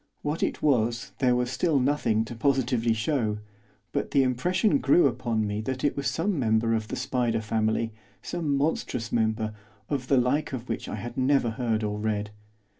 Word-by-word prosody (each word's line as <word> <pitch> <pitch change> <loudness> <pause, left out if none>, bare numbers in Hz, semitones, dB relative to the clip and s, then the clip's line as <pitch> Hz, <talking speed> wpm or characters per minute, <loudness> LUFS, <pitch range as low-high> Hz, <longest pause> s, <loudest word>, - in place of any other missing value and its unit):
What 150 +3 -2
it - - -1
was 115 -7 +1
there 125 -2 +3
was 125 0 0
still 145 +3 +2
nothing 125 -5 +1
to 115 - -7
positively 120 -2 +1
show, 110 -2 0 0.5
but - - -1
the 140 -2 +4
impression 160 - +2
grew 145 +6 +4
upon 120 -4 0
me 105 +1 -2
that 130 +3 -4
it 145 - +2
was 140 - -2
some 175 0 0
member 115 -1 +2
of 110 -1 -1
the - - -4
spider 125 -3 0
family, 110 +1 0 0.3
some 155 -5 -1
monstrous 130 -5 -1
member, 110 -1 0 0.4
of 135 -3 -2
the 135 - +4
like 135 +4 +1
of 125 -1 -5
which - - -4
I - - -3
had 120 +3 -7
never 130 -2 +2
heard 115 -2 -1
or 105 0 -2
read. 105 -1 -2
125 Hz, 185 wpm, -27 LUFS, 110-140 Hz, 0.5 s, the